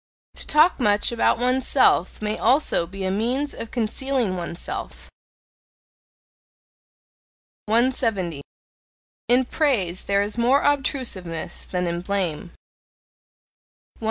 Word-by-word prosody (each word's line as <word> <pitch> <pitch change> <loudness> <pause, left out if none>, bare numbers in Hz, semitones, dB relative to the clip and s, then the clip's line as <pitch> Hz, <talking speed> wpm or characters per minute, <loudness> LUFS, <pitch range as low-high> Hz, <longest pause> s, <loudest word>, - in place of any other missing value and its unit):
To - - -4
talk 310 +3 +4
much 210 -3 +2
about 235 - +2
oneself 250 -5 +2
may 210 0 -1
also 260 - +2
be 195 +2 -7
a 185 - 0
means 245 +8 -1
of 230 - -7
concealing 245 -2 -1
oneself. 170 -1 -6 2.6
170. 220 - 0 0.9
In 250 +2 +4
praise 220 - 0
there 200 0 +2
is 210 +3 -4
more 255 +4 +3
obtrusiveness 250 - -2
than 180 -1 -2
in 170 0 -2
blame. 180 -4 -2
171. - - -23
220 Hz, 100 wpm, -23 LUFS, 185-260 Hz, 2.6 s, talk